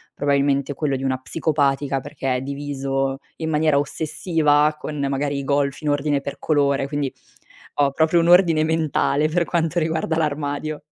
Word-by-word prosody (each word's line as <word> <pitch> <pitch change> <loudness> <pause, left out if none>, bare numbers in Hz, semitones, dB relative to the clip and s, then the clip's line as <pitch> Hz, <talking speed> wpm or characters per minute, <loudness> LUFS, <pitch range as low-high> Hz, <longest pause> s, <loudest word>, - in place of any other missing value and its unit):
probabilmente 140 -1 +1
quello 140 -1 -1
di 135 - -4
una 130 -1 0
psicopatica, 140 -3 0
perché 130 0 -3
è - - -4
diviso 135 -1 -2 0.2
in 160 -1 -3
maniera 155 -1 +2
ossessiva, 155 0 +1
con 150 - -6
magari 140 +1 -1
i - - -4
golf 140 0 0
in 150 - -1
ordine 145 -1 0
per 140 - -6
colore, 140 -3 +1
quindi 145 -2 -2 0.7
ho 140 -1 +3
proprio 160 +4 +2
un 165 - +1
ordine 170 -3 +5
mentale, 155 -2 +1
per 170 +1 +1
quanto 170 0 -1
riguarda 160 0 -1
l'armadio. 150 0 -2
145 Hz, 160 wpm, -22 LUFS, 140-155 Hz, 0.7 s, ordine